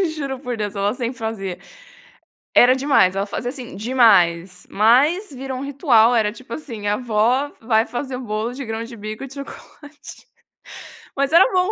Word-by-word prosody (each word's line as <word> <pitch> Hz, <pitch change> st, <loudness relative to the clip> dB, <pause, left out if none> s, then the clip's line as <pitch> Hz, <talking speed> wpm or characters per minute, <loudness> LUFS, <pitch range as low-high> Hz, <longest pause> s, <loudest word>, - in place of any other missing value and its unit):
Juro 275 Hz, -3 st, -4 dB
por 245 Hz, -3 st, -5 dB
Deus, 210 Hz, -1 st, -4 dB
ela 200 Hz, +2 st, 0 dB
sempre 245 Hz, 0 st, -4 dB
fazia. 210 Hz, -5 st, -4 dB, 1.0 s
Era 250 Hz, +1 st, +6 dB
demais, 265 Hz, -9 st, +3 dB
ela 195 Hz, -, -1 dB
fazia 245 Hz, +4 st, -4 dB
assim, 250 Hz, -7 st, -8 dB
demais, 190 Hz, -6 st, +2 dB
mas 285 Hz, -, +3 dB
virou 265 Hz, -1 st, -6 dB
um -, -, -5 dB
ritual, 250 Hz, -5 st, +3 dB
era 210 Hz, -2 st, +2 dB
tipo 235 Hz, 0 st, -11 dB
assim, 230 Hz, -9 st, -7 dB
a 205 Hz, -, +2 dB
avó 245 Hz, +5 st, 0 dB
vai 225 Hz, 0 st, +2 dB
fazer 255 Hz, +1 st, -5 dB
um 255 Hz, -, -7 dB
bolo 215 Hz, +2 st, -3 dB
de 270 Hz, 0 st, -7 dB
grão-de-bico 225 Hz, 0 st, -6 dB
e -, -, -6 dB
de 270 Hz, -, -13 dB
chocolate. 290 Hz, +1 st, -12 dB, 0.9 s
Mas 280 Hz, +1 st, 0 dB
era 340 Hz, +3 st, +7 dB
bom. 365 Hz, +3 st, +2 dB
240 Hz, 170 wpm, -20 LUFS, 215-270 Hz, 1.0 s, era